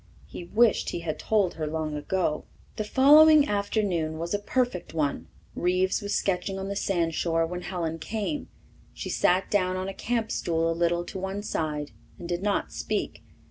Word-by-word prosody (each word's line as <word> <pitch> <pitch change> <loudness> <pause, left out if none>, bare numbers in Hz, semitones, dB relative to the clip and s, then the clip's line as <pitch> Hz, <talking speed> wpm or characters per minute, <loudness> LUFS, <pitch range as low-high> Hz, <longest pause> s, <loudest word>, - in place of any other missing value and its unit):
He 175 - -8
wished 225 +5 +3
he 170 - -4
had 160 -2 -4
told 205 -5 +1
her 155 -1 -4
long 155 0 -3
ago. 155 0 -1 0.3
The 215 - -2
following 295 +6 +7
afternoon 200 -6 0
was 170 +3 -3
a 205 - +1
perfect 205 -6 -1
one. 145 -3 -1 0.3
Reeves 185 +1 +1
was 205 0 -2
sketching 195 0 -1
on 195 0 -4
the 200 - -3
sandshore 165 -3 0
when 180 +2 -5
Helen 165 -3 -3
came. 220 - -3 0.5
She - - -5
sat 185 +2 +2
down 185 -3 +2
on 185 +1 -3
a 195 - -4
camp 230 +1 -2
stool 165 -1 0
a - - +1
little 170 +1 +1
to 190 - -6
one 190 +2 -4
side 150 -6 -3 0.3
and 170 - -7
did 175 0 -2
not 205 0 0
speak. - - -3
185 Hz, 180 wpm, -27 LUFS, 165-205 Hz, 0.5 s, following